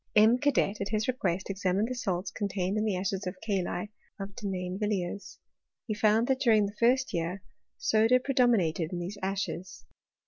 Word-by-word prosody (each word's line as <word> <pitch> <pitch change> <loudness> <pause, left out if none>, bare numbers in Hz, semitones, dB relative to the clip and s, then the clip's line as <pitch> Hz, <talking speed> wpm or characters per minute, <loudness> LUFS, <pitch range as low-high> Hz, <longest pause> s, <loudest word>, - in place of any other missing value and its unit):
M. 220 +4 +6
Cadet, 250 -8 +1
at 200 - -2
his 215 -1 0
request, 190 -7 -1
examined 195 +2 0
the 255 - -3
salts 190 -6 -2
contained 200 -2 -2
in 215 0 0
the 210 -3 +1
ashes 190 +1 -2
of 180 - -4
the 195 -3 -1
kali 180 +4 -4 0.3
of 195 0 -6
Denain* 185 -2 -4
villiers. 205 -2 -3 0.5
He 220 - -2
found 215 +2 +3
that 265 0 +1
during 220 -5 +4
the 200 +1 -6
first 255 +3 +3
year 175 +3 -2 0.3
soda 235 - +4
pre 275 +2 -3
dominated 185 - +2
in 180 - -3
these 180 +4 -5
ashes. 190 -1 -4
205 Hz, 180 wpm, -29 LUFS, 185-225 Hz, 0.5 s, M